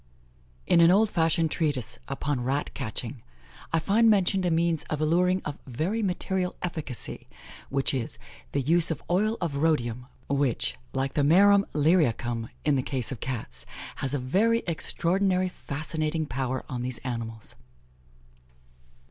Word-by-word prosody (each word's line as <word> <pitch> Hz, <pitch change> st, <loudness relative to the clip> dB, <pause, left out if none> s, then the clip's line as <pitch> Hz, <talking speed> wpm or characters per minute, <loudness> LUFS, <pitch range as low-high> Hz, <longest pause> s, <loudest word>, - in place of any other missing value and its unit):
In 170 Hz, -, +5 dB
an 165 Hz, -, +7 dB
old 210 Hz, +4 st, +4 dB
fashioned 165 Hz, -1 st, +2 dB
treatise 135 Hz, -8 st, -1 dB
upon 140 Hz, -2 st, -2 dB
Rat 135 Hz, +4 st, -1 dB
catching, 120 Hz, 0 st, -5 dB, 0.5 s
I 165 Hz, -, +2 dB
find 210 Hz, +8 st, +4 dB
mentioned 195 Hz, -2 st, +3 dB
a -, -, +2 dB
means 165 Hz, -1 st, +1 dB
of 155 Hz, -, -3 dB
alluring 180 Hz, +4 st, +2 dB
"of 145 Hz, -, -5 dB
very 165 Hz, -, -1 dB
material 185 Hz, -1 st, -1 dB
efficacy, 160 Hz, -8 st, -5 dB, 0.4 s
which 135 Hz, 0 st, +1 dB
is, 125 Hz, -4 st, -3 dB, 0.3 s
the 140 Hz, -, 0 dB
use 165 Hz, +5 st, +4 dB
of 160 Hz, -, -3 dB
oil 215 Hz, +5 st, +2 dB
of 165 Hz, -5 st, -2 dB
Rhodium, 125 Hz, -6 st, 0 dB, 0.2 s
which, 135 Hz, -, 0 dB, 0.2 s
like 135 Hz, 0 st, -2 dB
the 145 Hz, -, +1 dB
marumlyriacum, 155 Hz, -, +3 dB, 0.2 s
in 150 Hz, -1 st, +3 dB
the -, -, +1 dB
case 130 Hz, -2 st, -2 dB
of 130 Hz, -, -5 dB
Cats, 105 Hz, -, -5 dB, 0.3 s
has 135 Hz, +1 st, -1 dB
a -, -, +1 dB
very 205 Hz, -, +2 dB
extraordinary 185 Hz, +3 st, +1 dB
fascinating 155 Hz, 0 st, -3 dB
power 130 Hz, -1 st, -3 dB
on 125 Hz, -2 st, -4 dB
these 125 Hz, -1 st, -2 dB
animals." 115 Hz, -4 st, -5 dB
155 Hz, 140 wpm, -27 LUFS, 130-180 Hz, 0.5 s, an